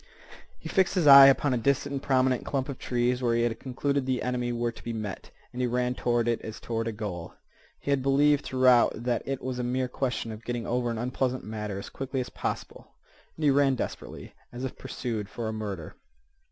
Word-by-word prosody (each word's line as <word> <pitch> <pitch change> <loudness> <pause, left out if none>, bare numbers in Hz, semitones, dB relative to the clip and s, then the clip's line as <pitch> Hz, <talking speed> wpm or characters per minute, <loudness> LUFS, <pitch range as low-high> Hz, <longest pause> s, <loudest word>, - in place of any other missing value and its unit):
He - - -9
fixed 190 -1 +2
his 180 -4 +2
eye 140 -1 +11
upon 135 0 +3
a 125 - 0
distant 140 +3 0
and 135 - -2
prominent 130 -2 +2
clump 135 0 -2
of 135 - -5
trees 125 +1 0
where 120 -2 +2
he 115 - +2
had 120 -1 -1
concluded 140 +1 -1
the 130 -1 0
enemy 125 -1 -1
were 120 0 -1
to - - -14
be 115 - -4
met, 105 -3 -5 0.2
and 125 - -3
he 125 - +2
ran 125 +1 0
toward 120 -2 0
it 120 -1 0
as 110 - -7
toward 115 -1 -3
a - - -1
goal. 100 -6 -6 0.4
He 140 - -3
had 140 -1 +2
believed 140 +2 +3
throughout 130 -2 +4
that 120 -1 0
it 135 -2 -3
was 130 -1 -3
a - - -1
mere 125 +1 0
question 125 -3 -2
of 110 +1 -9
getting 120 -1 -3
over 120 0 0
an 115 - -3
unpleasant 125 +2 -1
matter 105 -2 -5
as 100 - -7
quickly 135 0 -4
as 125 - -4
possible, - - -5 0.4
and 160 - -5
he 145 - +5
ran 135 -1 +3
desperately, - - -6 0.2
as 125 +2 -7
if 130 - -4
pursued 110 -5 -4
for 115 0 -5
a 110 - -3
murder. 100 -7 -5
125 Hz, 220 wpm, -27 LUFS, 115-135 Hz, 0.4 s, eye